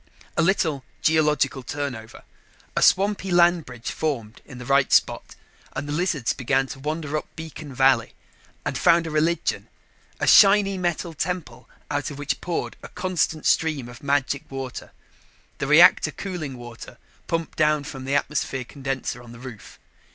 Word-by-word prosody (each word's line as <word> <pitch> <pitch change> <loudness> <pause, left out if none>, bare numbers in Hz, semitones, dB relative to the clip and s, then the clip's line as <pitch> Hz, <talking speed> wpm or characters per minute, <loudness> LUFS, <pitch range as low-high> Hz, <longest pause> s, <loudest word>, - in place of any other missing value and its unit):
A - - +2
little 160 -6 +1 0.2
geological 150 -4 +2
turnover, 125 -4 -6 0.5
a - - +1
swampy 195 0 +3
land 175 -2 +4
bridge 125 -2 -6
formed 120 -9 -3
in 130 - -11
the 125 - -8
right 135 +1 +3
spot, - - +2 0.4
and 145 - -4
the - - -4
lizards 155 -7 0
began 135 +1 +1
to - - -7
wander 155 +1 -3
up 155 - -2
beacon 160 -2 -8
valley. 130 -3 +3 0.5
And - - -2
found 170 -1 +4
religion. 160 +1 0 0.5
A - - 0
shiny 200 -1 +6
metal 175 -1 -2
temple 160 -7 -4 0.2
out 145 0 -1
of 145 - -8
which 145 0 -3
poured 175 -1 -3
a - - -8
constant 175 -4 -1
stream 155 -6 +1
of 120 -1 -12
magic 140 -1 -1
water 135 -2 -6 0.7
the - - -2
reactor - - +7
cooling 165 -9 -6
water 120 -1 -10 0.3
pumped 165 -1 -2
down 150 -2 +2
from 135 -2 -8
the 140 +1 0
atmosphere 140 -2 -1
condenser 135 -2 -4
on 120 -1 -12
the 115 - -12
roof. 125 -4 -11
145 Hz, 155 wpm, -24 LUFS, 130-165 Hz, 0.7 s, reactor